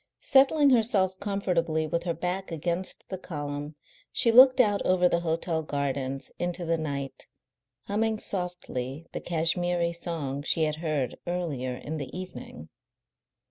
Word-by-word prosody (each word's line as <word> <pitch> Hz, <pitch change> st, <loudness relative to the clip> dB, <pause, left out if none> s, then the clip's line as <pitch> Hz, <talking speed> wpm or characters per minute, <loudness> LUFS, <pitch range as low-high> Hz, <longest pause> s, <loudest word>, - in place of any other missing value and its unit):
Settling 280 Hz, +1 st, +5 dB
herself 210 Hz, -6 st, +3 dB
comfortably 175 Hz, -6 st, 0 dB
with 170 Hz, +3 st, -2 dB
her 170 Hz, -, 0 dB
back 180 Hz, +2 st, -3 dB
against 170 Hz, +3 st, -3 dB
the 190 Hz, -, -4 dB
column 145 Hz, -3 st, -5 dB, 0.4 s
she 235 Hz, -, +3 dB
looked 255 Hz, +2 st, +8 dB
out 205 Hz, -5 st, +4 dB
over 185 Hz, -1 st, +4 dB
the 170 Hz, -, +2 dB
hotel 165 Hz, 0 st, -1 dB
gardens 140 Hz, -2 st, -2 dB
into 175 Hz, 0 st, -2 dB
the 165 Hz, 0 st, +2 dB
night, 140 Hz, -3 st, -4 dB, 0.6 s
humming 220 Hz, +2 st, 0 dB
softly 170 Hz, -8 st, -3 dB
the -, -, -5 dB
Kashmiri 170 Hz, +1 st, 0 dB
song 160 Hz, -5 st, -3 dB
she 160 Hz, +2 st, +1 dB
had 155 Hz, -1 st, 0 dB
heard 155 Hz, -5 st, -2 dB
earlier 150 Hz, -8 st, -2 dB
in 150 Hz, +5 st, -5 dB
the 140 Hz, -4 st, -5 dB
evening. 185 Hz, 0 st, -8 dB
170 Hz, 140 wpm, -28 LUFS, 150-185 Hz, 0.6 s, looked